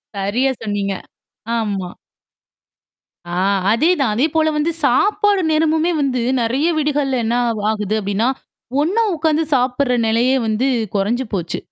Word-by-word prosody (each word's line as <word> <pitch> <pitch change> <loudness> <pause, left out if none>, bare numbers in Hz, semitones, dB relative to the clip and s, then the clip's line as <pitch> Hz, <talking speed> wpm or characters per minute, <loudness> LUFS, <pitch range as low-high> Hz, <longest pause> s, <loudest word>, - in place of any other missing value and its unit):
சரியா 220 +8 0
சொன்னீங்க. 205 -2 -2 0.7
ஆமா. 195 -5 -3 1.4
ஆ - - -3 0.4
அதேதான். 275 -2 +2
அதேபோல 315 +5 +1
வந்து 305 +3 +1
சாப்பாடு 405 - +2
நேரமுமே 320 +2 +2
வந்து 255 -4 0 0.2
நெறைய 260 +8 +1
வீடுகள்ல 285 -4 0
என்ன 230 +2 0
ஆகு 220 -2 -2
ஆகுது 210 -1 -2
அப்படின்னா 205 +4 0 0.5
ஒண்ணா 405 +9 +1
உட்கார்ந்து 320 0 +1
சாப்படுற 250 0 +1
நிலையே 245 +4 +2
வந்து 230 +5 +1 0.3
குறைஞ்சு 235 +6 0
போச்சு. 170 -2 -3
255 Hz, 120 wpm, -18 LUFS, 215-310 Hz, 1.4 s, அதேதான்